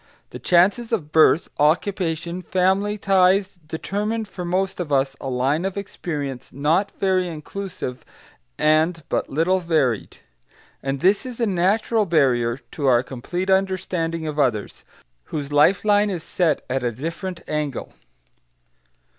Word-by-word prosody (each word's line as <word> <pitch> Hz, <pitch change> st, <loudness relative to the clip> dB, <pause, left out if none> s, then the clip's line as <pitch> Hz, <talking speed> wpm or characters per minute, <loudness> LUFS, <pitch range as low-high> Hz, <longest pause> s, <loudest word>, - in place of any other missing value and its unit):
The -, -, -8 dB
chances 195 Hz, +7 st, +3 dB
of 165 Hz, -10 st, -2 dB
birth, 160 Hz, +1 st, +5 dB
occupation, 170 Hz, +2 st, 0 dB
family 190 Hz, +3 st, +1 dB
ties, 190 Hz, -1 st, +2 dB
determine 210 Hz, +8 st, -2 dB
for 190 Hz, -3 st, -7 dB
most 185 Hz, +2 st, -1 dB
of 165 Hz, -5 st, -4 dB
us 135 Hz, -1 st, +1 dB
a 135 Hz, -, -4 dB
line 135 Hz, +6 st, 0 dB
of 195 Hz, 0 st, -3 dB
experience 145 Hz, -9 st, -5 dB
not 160 Hz, +9 st, +1 dB
very 185 Hz, -2 st, +2 dB
inclusive 165 Hz, -4 st, -6 dB, 0.5 s
and 155 Hz, +2 st, +2 dB
but -, -, -1 dB
little 165 Hz, +6 st, +2 dB
varied; 155 Hz, -, 0 dB, 0.6 s
and 135 Hz, 0 st, -3 dB
this 195 Hz, +3 st, +3 dB
is 250 Hz, -2 st, -8 dB
a 235 Hz, -, +2 dB
natural 205 Hz, +3 st, +1 dB
barrier 125 Hz, -7 st, +2 dB
to 135 Hz, +3 st, -5 dB
our 120 Hz, -1 st, +4 dB
complete 175 Hz, +10 st, -3 dB
understanding 180 Hz, -4 st, 0 dB
of 150 Hz, -1 st, -4 dB
others, 120 Hz, -7 st, 0 dB, 0.4 s
whose 145 Hz, -1 st, -5 dB
life 150 Hz, +8 st, +4 dB
line 205 Hz, 0 st, +4 dB
is 175 Hz, -5 st, -4 dB
set 165 Hz, -5 st, 0 dB
at 130 Hz, 0 st, -2 dB
a 120 Hz, -, 0 dB
different 165 Hz, -, -5 dB
angle. 150 Hz, -4 st, -3 dB
170 Hz, 140 wpm, -22 LUFS, 145-190 Hz, 0.6 s, birth